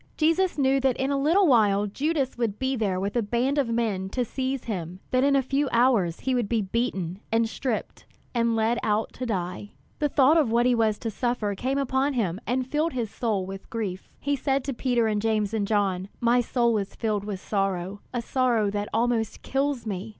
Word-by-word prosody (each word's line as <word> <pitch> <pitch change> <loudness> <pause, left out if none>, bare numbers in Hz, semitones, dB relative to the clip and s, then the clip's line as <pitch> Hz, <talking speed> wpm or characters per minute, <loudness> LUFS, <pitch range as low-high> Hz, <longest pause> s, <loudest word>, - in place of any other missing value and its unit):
Jesus 330 +3 +2
knew 270 -1 +3
that 265 -2 +1
in 265 +1 0
a - - +1
little 345 +7 +4
while 210 - +4
Judas 275 +5 -1
would 230 -4 -1
be 265 0 -1
there 200 -6 0
with 200 +3 -3
a 240 - +3
band 245 +7 0
of 265 -5 +1
men 215 -5 -1
to 250 +4 -1
seize 260 +2 -3
him; 180 -5 -5
that 255 0 +3
in 280 0 +4
a 270 - +3
few 275 +2 0
hours 230 -9 +2
he 260 - 0
would 240 -5 0
be 230 - +2
beaten, 190 -4 -2
and 225 0 +3
stripped, 235 0 -4 0.3
and 235 -1 +1
led 225 +2 +1
out 215 +1 0
to 255 - -5
die. 185 -1 -3 0.3
The 295 -1 +1
thought 285 +4 +5
of 285 -8 +2
what 235 +1 +3
he 250 - +4
was 220 -3 +2
to 225 - -4
suffer 240 -2 -1
came 260 +8 -2
upon 275 +1 +1
him 200 -6 -1
and 255 +1 0
filled 305 +5 0
his 235 -5 -2
soul 210 -6 -1
with 195 0 -8
grief. 200 -5 -4
He 285 +1 0
said 270 0 0
to 275 - -3
Peter 240 -2 +1
and 210 -1 0
James 215 -1 0
and 210 -2 0
John: 195 -3 0
"My 240 +1 +3
soul 235 -2 +1
is 195 -1 -6
filled 215 -3 -1
with 205 -2 -4
sorrow, 195 -1 -2
a 245 -1 -3
sorrow 235 -5 +1
that 205 0 -3
almost 230 -1 0
kills 270 -2 -1
me. 205 0 -4
235 Hz, 215 wpm, -26 LUFS, 205-265 Hz, 0.3 s, thought